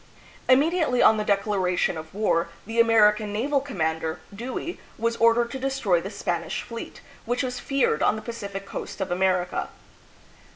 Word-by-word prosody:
Immediately 295 0 +4
on 220 - +6
the 210 - 0
declaration 200 -4 +1
of 160 0 -8
war, 170 -6 +1 0.2
the 225 +2 -3
Amer 225 -2 +6
ican 210 0 -5
naval 260 +8 0
commander, 160 - -2 0.2
Dewey, 255 - -5 0.2
was 230 +1 0
ordered 230 +1 +3
to 265 - -5
destroy 260 -10 +1
the 190 - -5
Spanish 175 -4 -3
fleet, 230 -1 -8 0.2
which 245 +3 0
was 250 -1 -3
feared 275 - +1
on - - +3
the 215 - -7
Pacific 200 -4 -6
coast - - -7
of 190 -2 -3
America. 180 0 0
215 Hz, 160 wpm, -25 LUFS, 185-245 Hz, 0.2 s, on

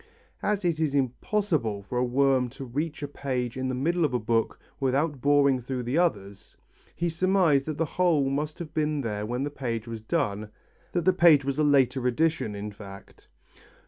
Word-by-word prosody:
As 205 -2 -1
it 165 -3 +1
was 150 -3 0
impossible 135 - -1
for 125 +5 -3
a - - +2
worm 130 0 +2
to 135 - -6
reach 150 +5 -4
a - - -2
page 130 -4 -3
in 130 0 -2
the 130 - -2
middle 170 +7 0
of 150 - +3
the - - +3
book 115 0 -1 0.2
without 140 +1 0
boring 140 -2 +3
through 125 +1 -4
the 125 +7 0
others, 100 - -2 0.4
he 170 - -1
surmised 170 -4 +2
that 155 -2 -3
the 165 - +1
hole 160 -4 +1
must 150 +2 -2
have 160 -3 -8
been 155 -2 0
there 105 -3 -3
when 125 +3 -2
the 145 - -3
page 120 -5 -4
was 115 -1 -6
done, 105 -1 -2 0.4
that 175 -2 0
the 185 - +5
page 165 -6 +5
was 140 +1 -2
a - - +3
later 135 -3 +3
addition 155 -4 0
in 105 +1 -5
fact. 100 -1 -13
140 Hz, 195 wpm, -27 LUFS, 120-155 Hz, 0.4 s, the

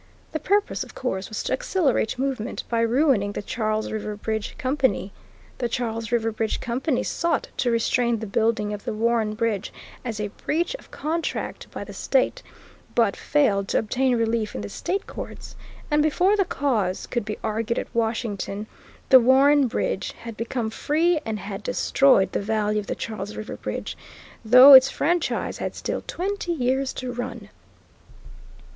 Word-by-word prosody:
The 315 - -2
purpose, 410 +4 +1
of - - -14
course, 190 -7 -3
was 215 - -4
to - - -1
accelerate 340 - 0
movement 255 -3 -2
by 230 -1 +1
ruining 230 -4 +2
the - - -4
Charles 215 0 -2
River 210 -1 -4
Bridge 220 0 -4
Company. 260 -6 0 0.5
The 240 -2 -1
Charles 230 -2 -3
River 225 -1 +1
Bridge 220 0 -2
Company 250 +3 -1
sought 335 -3 -1
to 250 - +1
restrain 235 +1 +1
the 220 - -5
building 215 0 0
of 205 - -6
the - - -3
Warren 225 -1 +1
Bridge 220 -3 -1 0.3
as 225 -4 -4
a 210 -1 -2
breach 335 - -2
of - - -18
contract 325 +2 -3
by - - -6
the - - -10
State, - - +1 0.5
but 225 -4 +3
failed 205 -10 +1
to - - +1
obtain 255 +3 +1
relief 225 -1 0
in 105 - -3
the 100 - -6
state 390 - -3
courts, - - -8 0.4
and 295 0 +4
before 355 +7 +3
the 395 -2 +2
cause 220 - -1
could 240 -3 -2
be 210 +1 -5
argued 225 +1 -1
at - - -4
Washington 220 -3 -2 0.4
the 260 - +9
Warren 270 +3 +5
Bridge 240 - -2
had 230 -1 -9
become 230 0 -3
free 320 +7 +1
and 220 -1 -2
had 195 +1 -6
destroyed 250 -4 +3
the - - -1
value 210 0 0
of 205 - -7
the - - -2
Charles 210 -2 -5
River 215 - -6
Bridge, - - -5 0.5
though 250 +5 +9
its 265 0 +10
franchise 345 +1 -1
had - - -3
still - - -3
twenty 370 -1 -2
years 265 -2 0
to 255 -1 -5
run. 245 +1 -6
235 Hz, 165 wpm, -24 LUFS, 215-270 Hz, 0.5 s, its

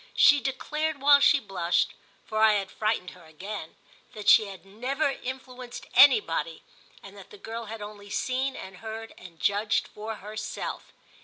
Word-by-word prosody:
She 290 -1 +7
declared 300 +3 -2
while 285 +1 +7
she 285 +1 +5
blushed—for 195 +2 -2
I 220 -1 +6
had 195 -2 -1
frightened 215 -4 -1
her 180 -2 -16
again—that 195 +4 -10
she 220 - +7
had 195 -1 -11
never 260 +9 -1
influenced 255 -1 -7
anybody 475 +2 +4 0.4
and - - -12
that - - -13
the 425 - -13
girl 230 - -7
had 220 0 -7
only 205 -1 -10
seen 260 +5 -1
and 190 -1 -9
heard 225 +2 -7
and 170 -3 -14
judged 205 +2 +1
for 220 +1 -6
herself. 215 +1 -6
220 Hz, 150 wpm, -27 LUFS, 200-265 Hz, 0.4 s, She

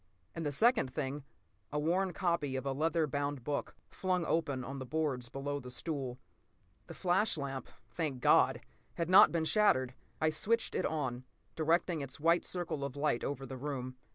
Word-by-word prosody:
And 165 - -4
the 145 - -1
second 225 - +3
thing—a 140 +1 -6
worn 180 +5 +1
copy 170 -7 0
of 130 - -3
a 135 - 0
leather 160 +3 +1
bound 145 -2 -2
book, 145 +3 -3
flung 185 -2 -1
open 145 -5 0
on 135 +2 -6
the 130 - -5
boards 140 -5 -1
below 145 +2 -3
the 125 -2 -9
stool! 130 -2 -4 0.7
The - - -9
flash 185 +1 +2
lamp, 135 -2 -4 0.2
thank 150 -6 -2
God! - - +4 0.3
had 170 +1 -2
not 190 - +9
been 165 -2 0
shattered. 130 - +3 0.3
I 155 0 +2
switched 225 +9 0
it - - +1
on, 130 -6 -2 0.3
directing 165 +1 +1
its 140 +1 -6
white 165 +3 +3
circle 170 -5 -3
of 140 -1 -4
light 145 -4 0
over 135 -1 -3
the 135 -1 -7
room. 130 -2 -4
145 Hz, 175 wpm, -33 LUFS, 135-170 Hz, 0.7 s, not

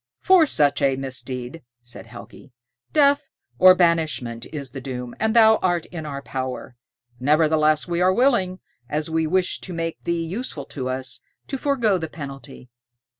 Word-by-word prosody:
"For 370 -5 +5
such 145 - +2
a 135 -1 +3
misdeed," 130 +2 -5 0.2
said 120 -1 -10
Helgi, 120 +3 -13 0.4
"death 285 -1 +3 0.3
or 185 0 +8
banishment 155 -9 0
is 140 -5 -5
the 135 0 -7
doom, 125 -2 -6
and 220 +1 0
thou 220 -1 +7
art 175 -3 0
in 160 -3 -7
our 140 -1 -6
power. 130 -1 -5 0.4
Nevertheless, 155 +2 +2
we 175 0 -1
are 185 +1 +4
willing, 190 -6 +1 0.3
as 155 +2 -2
we 160 0 +1
wish 185 +2 0
to 185 - -8
make 165 -1 -4
thee 170 -1 -1
useful 170 - -5
to 130 -3 -3
us, 130 0 -4 0.2
to 275 - -5
forego 245 -8 +1
the 160 -1 -5
penalty. 135 -4 -10
155 Hz, 160 wpm, -23 LUFS, 135-185 Hz, 0.4 s, or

